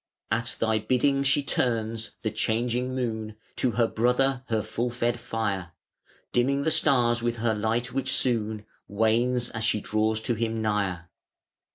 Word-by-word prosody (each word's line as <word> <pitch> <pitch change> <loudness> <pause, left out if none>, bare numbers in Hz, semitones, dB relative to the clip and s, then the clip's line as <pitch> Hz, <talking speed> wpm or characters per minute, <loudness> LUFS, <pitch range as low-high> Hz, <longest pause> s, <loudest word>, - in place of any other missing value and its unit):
At 115 +2 -1
Thy 110 -1 +2
bidding 130 +5 +2
she 140 +1 +2
turns, 115 -4 -1
the 110 - 0
changing 120 +4 0
Moon 110 -4 -3 0.2
To 130 - +2
her 115 - +3
Brother 125 +3 +1
her 110 -2 0
full 120 +2 -2
fed 120 0 -1
fire, 100 -7 -3 0.6
Dimming 135 +3 +2
the 160 - +2
Stars 120 -6 +3
with 120 0 -1
her 115 0 +1
light, 110 +3 -1
which 135 -1 0
soon 110 -4 +1 0.2
Wanes, 115 +4 +1
as 115 -1 -4
she 105 - +2
draws 110 +1 0
to 120 - 0
him 115 0 -2
nigher. 100 -5 -1
115 Hz, 155 wpm, -26 LUFS, 110-125 Hz, 0.6 s, her